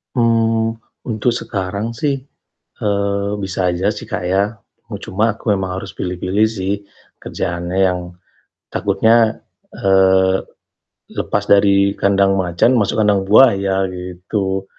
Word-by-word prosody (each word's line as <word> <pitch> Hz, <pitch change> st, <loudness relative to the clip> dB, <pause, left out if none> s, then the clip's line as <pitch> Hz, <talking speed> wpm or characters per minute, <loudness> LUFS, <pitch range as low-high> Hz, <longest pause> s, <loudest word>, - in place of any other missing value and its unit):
Mmm, 115 Hz, -1 st, +1 dB, 0.3 s
untuk 110 Hz, +2 st, 0 dB
sekarang 100 Hz, 0 st, -3 dB
sih, 140 Hz, +4 st, -1 dB, 0.6 s
eee, 100 Hz, -1 st, -1 dB
bisa 95 Hz, -1 st, -1 dB
aja 90 Hz, +3 st, -1 dB
sih, 105 Hz, -, -8 dB
Kak, 100 Hz, -5 st, -4 dB
ya. 95 Hz, +3 st, +2 dB, 0.4 s
U -, -, -6 dB
cuma 110 Hz, +3 st, -1 dB
aku 110 Hz, -, -2 dB
memang 95 Hz, -1 st, -2 dB
harus 100 Hz, -, -8 dB
pilih-pilih 90 Hz, +4 st, 0 dB
sih 100 Hz, -3 st, -3 dB, 0.5 s
kerjaannya 85 Hz, +1 st, -4 dB
yang 90 Hz, 0 st, -1 dB, 0.7 s
takutnya, 110 Hz, +3 st, +2 dB, 0.3 s
eee, 95 Hz, -1 st, +3 dB, 0.8 s
lepas -, -, -1 dB
dari 100 Hz, 0 st, +4 dB
kandang 100 Hz, 0 st, +2 dB
macan, 95 Hz, +7 st, +2 dB
masuk 105 Hz, 0 st, +1 dB
kandang 100 Hz, -2 st, +2 dB
buaya 95 Hz, -4 st, +4 dB
gitu. 95 Hz, +2 st, -4 dB
100 Hz, 120 wpm, -18 LUFS, 95-110 Hz, 0.8 s, dari